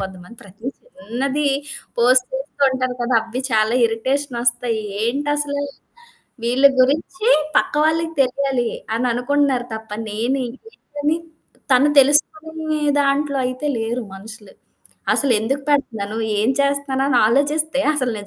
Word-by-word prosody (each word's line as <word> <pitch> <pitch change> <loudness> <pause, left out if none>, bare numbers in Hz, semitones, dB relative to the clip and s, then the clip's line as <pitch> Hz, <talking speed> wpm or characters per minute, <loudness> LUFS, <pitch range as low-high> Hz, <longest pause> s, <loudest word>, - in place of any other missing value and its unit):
కొంతమంది 190 +2 -8
ప్రతి 200 +3 -17
చిన్నది 280 - -3 0.5
పోస్ట్ 250 +1 +4
చేస్తూ 270 +1 -5
ఉంటారు 255 -1 -2
కదా! 240 0 0
అవ్వి 230 +3 -5
చాలా 220 +2 +2
ఇరిటేషన్ 250 +3 -1
ఒస్తాయి. 240 -2 +1 0.2
ఏంటసలు? 285 +3 -1 0.8
వీళ్ళ 250 +3 +1 0.2
గురించి 325 - +1 0.3
పక్క - - +2
వాళ్ళకి 325 +1 +1
తెలియాలి, 260 -2 0 0.3
అననుకుంటున్నారు 250 +2 +1
తప్ప, 220 0 -8 0.2
నేనేంటి? 250 - -3
ఏంటని 295 +2 -2 0.6
తను 260 +3 +5
తెలుసుకొనే 310 +2 0 0.2
దాంట్లో 280 0 +1
అయితే 255 +4 -4
లేరు 230 +2 -2
మనుషులు. 210 +1 -12 0.6
అసలెందుకు 265 +1 +1
పెడతున్నాను? 220 -7 -1 0.2
ఏం 215 +3 +2
చేస్తున్నానని 280 -2 +1
ఆలోచిస్తే, 290 +4 +1
అసలు 255 -5 -1
260 Hz, 110 wpm, -20 LUFS, 235-285 Hz, 0.8 s, తను